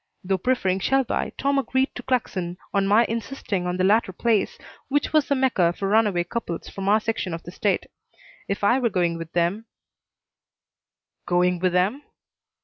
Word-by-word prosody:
Though 190 0 0
preferring 190 -5 +1
Shelby, 270 +5 0
Tom 280 0 +1
agreed 265 0 0
to - - -7
Claxon 185 -8 -2 0.2
on 200 -1 +2
my 215 +4 +5
insisting 225 -5 -3
on 180 0 -2
the 185 - +1
latter 205 +1 +3
place, 220 +2 0 0.3
which 290 +2 0
was 305 -2 +3
the 280 - +2
Mecca 245 -11 +2
for 195 - -3
runaway 205 -4 +3
couples 175 -2 -5
from 195 0 -3
our 215 +1 +5
section 215 -6 -2
of 170 - -9
the 175 - -9
state. 200 +2 0 0.6
If 200 +1 -3
I 240 +6 +4
were 240 -3 +1
going 175 -4 0
with 165 -1 -7
them 175 +6 0 1.6
"Going 180 0 +2
with 185 0 +1
them?" 195 +10 +1
200 Hz, 170 wpm, -24 LUFS, 180-235 Hz, 1.6 s, my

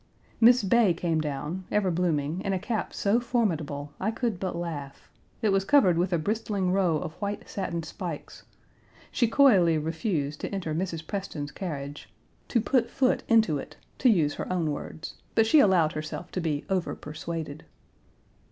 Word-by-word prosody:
Miss 240 0 +6
Bay 200 -2 +4
came 165 -2 0
down, 150 +5 -4
ever 200 -3 +2
blooming, 165 -1 0
in 195 - -1
a - - +1
cap 220 +3 -2
so 210 +4 +1
formidable, 160 - -1
I 195 - 0
could 225 -4 -2
but 185 -2 -3
laugh. 155 -5 -6 0.3
It 215 - +3
was 195 -1 +2
covered 195 -5 +5
with 175 +2 0
a 175 - +3
bristling 200 +1 -1
row 185 -4 +2
of 155 -1 -5
white 205 0 -3
satin 170 -4 -3
spikes. 165 -1 -7 0.7
She 240 - +2
coyly 200 - +5
refused 155 -1 -2
to - - -3
enter 185 -6 -3
Mrs. 165 -1 -3
Preston's 160 -7 -4
carriage 145 -6 -6 0.4
"to 240 - +2
put 235 +1 +1
foot 260 -2 +1
into 220 -11 +4
it," - - -10 0.2
to 255 - +5
use 160 -9 +3
her - - -5
own 170 -4 0
words; 150 +2 -7
but 225 - +5
she 295 +7 +6
allowed 180 - +4
herself 155 0 -6
to 185 - -2
be 150 -3 -2
overpersuaded. 160 -4 -4
180 Hz, 165 wpm, -27 LUFS, 155-205 Hz, 0.7 s, Miss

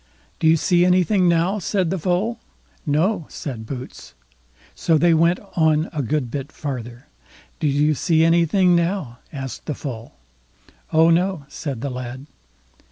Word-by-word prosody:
"Do 160 - +2
you 160 +1 +5
see 175 +2 +3
anything 180 +1 +3
now", 170 +5 +1
said 185 -2 -1
the 190 - -1
Foal. 190 +8 -1 0.5
"No", 165 +4 +1
said 115 -6 -7
Boots. 125 - -8 0.6
So 160 - +2
they 170 +2 +4
went 170 +2 +3 0.2
on 160 -1 +2
a 150 - -1
good 135 -1 -2
bit 140 +1 -5
farther. 125 -4 -6 0.5
"Do 150 - 0
you 145 +2 +2
see 160 +2 +2
anything 170 +2 +3
now?" 170 -8 -1
asked 135 -2 -7
the 150 - -2
Foal. 115 - -7 0.8
"Oh 160 +1 +5
no", 175 -3 +1
said 140 -4 -5
the 140 - -3
lad. 125 +1 -6
160 Hz, 150 wpm, -21 LUFS, 140-175 Hz, 0.8 s, you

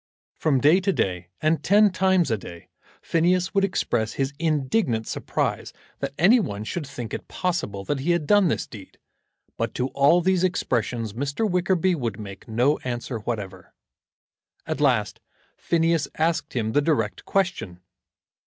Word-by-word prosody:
From 145 -4 +1
day 155 +7 +5
to 195 +1 +1
day, 90 - -1
and 155 -1 +2
ten 205 +1 +5
times 185 -5 +2
a 110 - +1
day, 85 -3 -11 0.3
Phineas 180 +3 +1
would 195 -1 +2
express 120 - 0
his 135 0 -2
indignant 145 - 0
surprise - - -2 0.3
that 140 0 -4
any 210 +10 +6
one 105 - -3
should 145 +6 -4
think 125 -5 -7
it - - -5
possible 170 - -2
that 140 +7 -2
he 145 +6 -2
had 170 -3 +2
done 205 +2 +4
this - - -1
deed, 100 -5 -12 0.6
but - - -2
to 125 +1 -1
all 140 +6 +4
these 185 0 +1
expressions 120 - -1
Mr. 140 - -1
Wickerby 180 -1 +1
would 115 - -3
make 100 -2 -9
no 125 +6 +2
answer 120 -1 -4
whatever. 100 -5 -6 0.9
At - - -3
last - - +1 0.4
Phineas 165 -3 +1
asked 160 +1 0
him 110 -3 0
the 145 - +3
direct 140 -9 0
question. 180 - -1
145 Hz, 155 wpm, -24 LUFS, 115-180 Hz, 0.9 s, any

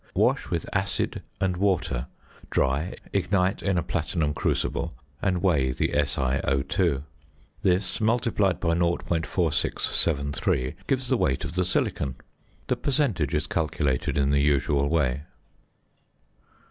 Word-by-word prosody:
Wash - - +2
with - - -2
acid - - 0 0.2
and 95 -2 0
water, 90 -10 0 0.4
dry, 70 +7 0 0.2
ignite 95 0 +1
in 100 -3 +1
a 85 - +1
platinum 80 -2 -1
crucible, 75 - -1 0.3
and 90 -2 0
weigh 75 -9 +3
the - - 0
SiO_. 70 +2 +1 0.6
This, 95 0 +1
multiplied 110 - +2
by 85 - +1
0.4673, 80 -5 0
gives 130 -1 0
the 130 - +2
weight 65 - +1
of 70 - -5
the 90 +1 +1
silicon. 70 -6 0 0.5
The - - 0
percentage 120 - 0
is - - 0
calculated 75 -6 0
in 70 0 +2
the 70 0 +3
usual 70 -1 +2
way. 70 -4 +1
80 Hz, 120 wpm, -26 LUFS, 70-95 Hz, 0.6 s, weigh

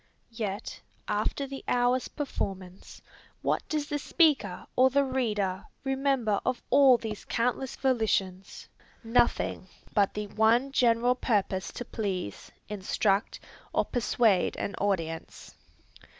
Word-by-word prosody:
Yet 215 -2 -4 0.3
after 215 +6 -1
the 270 0 -8
hour's 245 +1 +2
performance, 190 - -6 0.4
what - - +1
does 300 -2 -1
the 295 -1 -2
speaker 290 - +2
or 260 +1 +5
the 280 +2 +3
reader 210 -8 -1 0.2
remember 270 -6 +1
of 255 -1 -1
all 270 -3 +7
these 220 -3 -6
countless 250 +2 -1
volitions? 210 -7 -1 0.4
Nothing 230 -4 +1 0.3
but 200 -2 +2
the 210 0 -3
one 225 +6 +2
general 245 -1 +3
purpose 200 -6 -1
to 245 - -6
please, 190 - -4 0.2
instruct, 205 0 0 0.3
or - - +2
persuade 230 -5 +2
an - - -3
audience. 165 -5 -3
230 Hz, 115 wpm, -28 LUFS, 200-260 Hz, 0.4 s, all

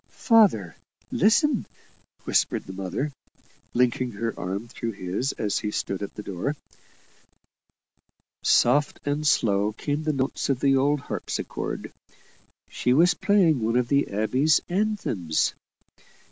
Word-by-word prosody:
"Father, 180 - +5 0.4
listen!" 240 - +3 0.6
whispered - - +1
the 95 - -8
mother, 95 +10 -3 0.6
linking 125 0 +1
her 115 +3 -3
arm 100 +5 -4
through 115 -1 -5
his 95 +8 -2
as 105 -2 -1
he 105 - -3
stood 100 -2 -3
at 100 - -6
the 105 - -7
door. 100 +10 -3 1.9
Soft 145 +5 +3
and 145 +1 -1
slow 105 -5 +2
came 145 +6 -3
the 155 0 0
notes 135 +1 -2
of 135 -3 +1
the 135 0 +3
old 140 +1 +2
harpsichord - - -5 0.7
she 125 - 0
was 170 +5 +5
playing 170 - +3
one 115 +2 0
of 125 -1 0
the 140 0 +2
abbey 110 +8 0 0.2
anthems. 180 - 0
125 Hz, 125 wpm, -25 LUFS, 105-150 Hz, 1.9 s, Father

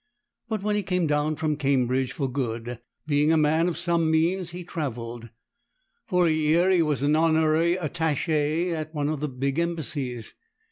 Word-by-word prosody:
But 215 -3 -2
when 210 0 +1
he 210 - 0
went 180 -4 +1
down 150 +1 +1
from 155 -1 -1
Cambridge 130 -2 +1
for 140 - -2
good, 120 -2 -4 0.3
being 150 0 +2
a 165 - +4
man 160 +2 +3
of 175 - -2
some 170 -2 +1
means, 170 +3 +1
he 175 +1 -7
travelled. 120 -8 -5 0.8
For 180 -1 +2
a 165 - +3
year 155 +4 +3
he 180 -2 +4
was 150 -4 0
an 150 +1 +3
honorary 160 +1 +3
Attache 160 0 0
at 155 -1 -4
one 145 -1 0
of 155 -2 -2
the 150 +1 -2
big 135 +3 -2
Embassies. 145 -8 -3
155 Hz, 175 wpm, -25 LUFS, 140-170 Hz, 0.8 s, a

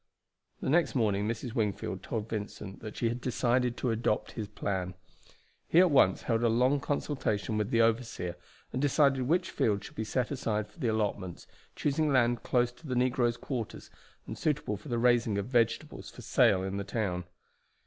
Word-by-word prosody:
The - - -1
next 170 0 +3
morning 105 -4 +1
Mrs. 115 +1 -3
Wingfield 105 -5 -2
told 110 +1 -4
Vincent 105 -2 -6
that 110 -1 -8
she 120 - +1
had 120 +2 -2
decided 125 0 +1
to 125 - 0
adopt 110 -1 0
his 110 -3 -5
plan. 95 -3 -3 0.7
He 165 - +5
at 180 -2 +6
once 130 -9 +4
held 115 -1 +1
a 120 - +3
long 125 +5 +3
consultation 135 -7 -1
with 105 0 0
the 115 -2 +3
overseer, 115 -6 0 0.4
and 130 - -1
decided 140 -2 +3
which 175 +4 +1
fields 100 -2 0
should - - -11
be 110 - -2
set 125 +4 -1
aside 110 -6 -1
for - - -21
the 125 - 0
allotments, 105 -5 -2 0.3
choosing 150 +1 +1
land 120 -2 +3
close 120 -1 +1
to 150 +6 -14
the 130 - -2
negroes' 125 -1 +2
quarters 120 -6 -5 0.3
and - - -7
suitable 150 -8 0
for 105 - -10
the 120 - 0
raising 120 -3 +3
of 100 - -1
vegetables 120 +5 0
for - - -12
sale 110 -8 +4
in 95 +1 -3
the 100 - -2
town. 95 -5 -2
115 Hz, 185 wpm, -30 LUFS, 105-130 Hz, 0.7 s, at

